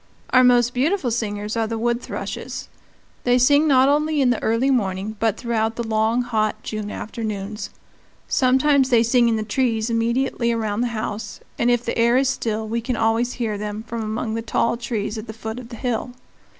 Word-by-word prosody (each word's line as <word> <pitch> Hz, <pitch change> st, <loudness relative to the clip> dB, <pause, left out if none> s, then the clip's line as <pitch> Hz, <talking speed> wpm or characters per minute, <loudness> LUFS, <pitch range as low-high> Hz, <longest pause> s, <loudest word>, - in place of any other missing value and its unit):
Our 255 Hz, 0 st, +6 dB
most 245 Hz, -1 st, +4 dB
beautiful 275 Hz, +1 st, +1 dB
singers 210 Hz, -2 st, -2 dB
are 225 Hz, -1 st, 0 dB
the 225 Hz, 0 st, -3 dB
wood 235 Hz, +1 st, 0 dB
thrushes; -, -, -6 dB, 0.5 s
they 245 Hz, 0 st, +3 dB
sing 285 Hz, +5 st, +4 dB
not 265 Hz, -2 st, +5 dB
only 300 Hz, +1 st, +2 dB
in 260 Hz, -3 st, +4 dB
the 240 Hz, -, -1 dB
early 230 Hz, +5 st, +2 dB
morning 205 Hz, -3 st, -1 dB
but 225 Hz, -3 st, +1 dB
throughout 225 Hz, -2 st, -1 dB
the 235 Hz, -, -3 dB
long 220 Hz, +2 st, +1 dB
hot 215 Hz, -3 st, -1 dB
June 215 Hz, -1 st, -4 dB
afternoons. 210 Hz, -2 st, -5 dB, 0.6 s
Sometimes 265 Hz, +1 st, +3 dB
they 235 Hz, -3 st, +5 dB
sing 235 Hz, 0 st, +3 dB
in 225 Hz, -, +2 dB
the 215 Hz, -, -1 dB
trees 225 Hz, 0 st, 0 dB
immediately 235 Hz, +1 st, 0 dB
around 220 Hz, -1 st, -1 dB
the 245 Hz, -, +1 dB
house, 210 Hz, -1 st, -5 dB, 0.2 s
and 240 Hz, -, +3 dB
if 240 Hz, 0 st, +1 dB
the -, -, -2 dB
air 235 Hz, +2 st, +4 dB
is 265 Hz, 0 st, +3 dB
still 220 Hz, -4 st, -2 dB
we 230 Hz, +2 st, -2 dB
can 245 Hz, +2 st, -2 dB
always 225 Hz, +2 st, +1 dB
hear 220 Hz, -4 st, -3 dB
them 210 Hz, +1 st, -4 dB
from 235 Hz, -1 st, -4 dB
among 220 Hz, 0 st, -3 dB
the 230 Hz, -, -2 dB
tall 230 Hz, +1 st, 0 dB
trees 225 Hz, -2 st, -3 dB
at 215 Hz, -, -9 dB
the 220 Hz, -, -6 dB
foot 220 Hz, +2 st, -5 dB
of 240 Hz, -2 st, -10 dB
the 240 Hz, -, -8 dB
hill. 245 Hz, +1 st, -2 dB
230 Hz, 200 wpm, -22 LUFS, 220-250 Hz, 0.6 s, Our